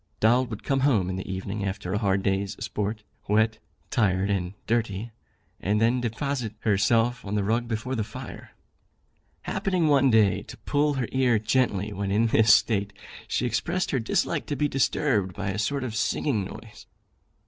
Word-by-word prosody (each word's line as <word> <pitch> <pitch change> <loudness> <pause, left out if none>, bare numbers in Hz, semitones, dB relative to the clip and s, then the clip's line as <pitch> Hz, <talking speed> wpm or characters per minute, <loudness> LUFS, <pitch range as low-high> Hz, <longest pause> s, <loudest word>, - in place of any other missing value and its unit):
Doll 120 +4 +4
would 110 -3 -7
come 135 -1 +1
home 110 -10 +2
in - - -3
the 95 0 -5
evening 95 +2 -4
after 95 -1 -3
a 105 - +1
hard 100 -2 +1
day's 100 0 0
sport, 105 0 -3 0.2
wet, 110 +2 +2 0.3
tired 100 -5 +1
and 95 -1 -2
dirty, 115 -1 -1 0.5
and 105 +2 0
then 120 +3 +2
deposit 120 -1 -3
herself 115 +3 +2
on 100 +1 -3
the 105 - +1
rug 115 +4 0
before 115 +3 -3
the 115 -4 0
fire. 120 +4 -9 0.9
Happening 185 -4 0
one 140 -2 +4
day 105 -5 +4
to - - -11
pull 145 0 0
her 130 -4 -1
ear 130 -3 +3
gently 105 -2 0
when 100 0 -3
in 110 +3 +3
this 110 -1 +4
state, 105 -2 +3 0.3
she - - -1
expressed 165 - -1
her 135 - +1
dislike 115 - -1
to 145 - -2
be 150 +1 +1
disturbed 125 - +1
by 100 -1 -3
a 100 - -4
sort 140 +5 -1
of 125 -4 -4
singing 115 -1 0
noise. 110 +2 -11
110 Hz, 175 wpm, -26 LUFS, 100-125 Hz, 0.9 s, Doll